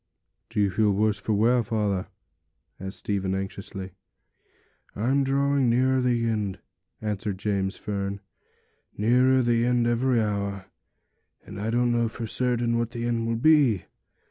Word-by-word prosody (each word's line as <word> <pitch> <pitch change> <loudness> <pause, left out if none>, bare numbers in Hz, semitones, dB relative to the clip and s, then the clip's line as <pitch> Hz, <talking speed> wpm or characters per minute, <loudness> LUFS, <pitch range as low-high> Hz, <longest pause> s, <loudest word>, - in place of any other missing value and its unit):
'Do 115 - -3
you 100 -2 +2
feel 105 +2 +2
worse, 105 +1 +1
father?' 110 -2 +1 0.7
asked 95 +1 -6
Stephen 95 -2 -2
anxiously. 95 0 -6 1.0
'I'm 130 +6 +1
drawing 140 -1 +2
nearer 130 +2 +3
the 120 -2 +1
end,' 105 -4 -1 0.5
answered 105 -2 -2
James 95 0 -1
Fern, 100 -1 -3 0.8
'nearer 125 +4 +4
the 115 -1 +2
end 120 -1 +2
every 120 +1 +2
hour; 100 -2 -2 0.8
and 100 - -8
I 110 - -2
don't 120 +1 +2
know 120 -1 +2
for 115 +1 -6
certain 120 0 0
what 115 -1 -1
the 120 -1 -4
end 115 -1 -1
will 115 - 0
be. 130 - +4
115 Hz, 135 wpm, -26 LUFS, 100-120 Hz, 1.0 s, nearer